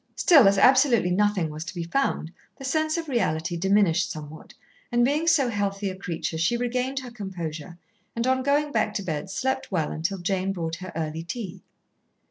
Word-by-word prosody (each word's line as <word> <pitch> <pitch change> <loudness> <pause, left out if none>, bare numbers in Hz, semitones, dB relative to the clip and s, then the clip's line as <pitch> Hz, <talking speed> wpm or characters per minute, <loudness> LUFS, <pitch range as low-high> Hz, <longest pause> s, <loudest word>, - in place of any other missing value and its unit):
Still 290 - +6
as 195 0 +4
absolutely 255 -5 +5
nothing 190 -4 +1
was 155 +1 -6
to 160 - -7
be 170 - -3
found, 170 -4 -1 0.3
the 270 - -8
sense 310 +4 0
of 330 -1 -4
reality 175 - 0
diminished 185 -1 +2
somewhat, 155 0 -9 0.4
and 240 0 +3
being 300 +5 0
so 310 -6 +4
healthy 200 -2 -2
a - - -8
creature, 170 -3 -4
she 175 +8 +2
regained 250 +2 -2
her 260 -2 -4
composure, 175 -6 -6 0.4
and 230 +1 -1
on 260 0 +2
going 290 +2 +1
back 215 -3 0
to 200 - -2
bed 165 +1 -4
slept 265 +5 -2
well 160 -5 0
until 170 +5 -2
Jane 190 +1 -1
brought 165 -2 -4
her 185 -1 -8
early 160 0 -3
tea. 185 +1 -6
195 Hz, 185 wpm, -25 LUFS, 170-255 Hz, 0.4 s, Still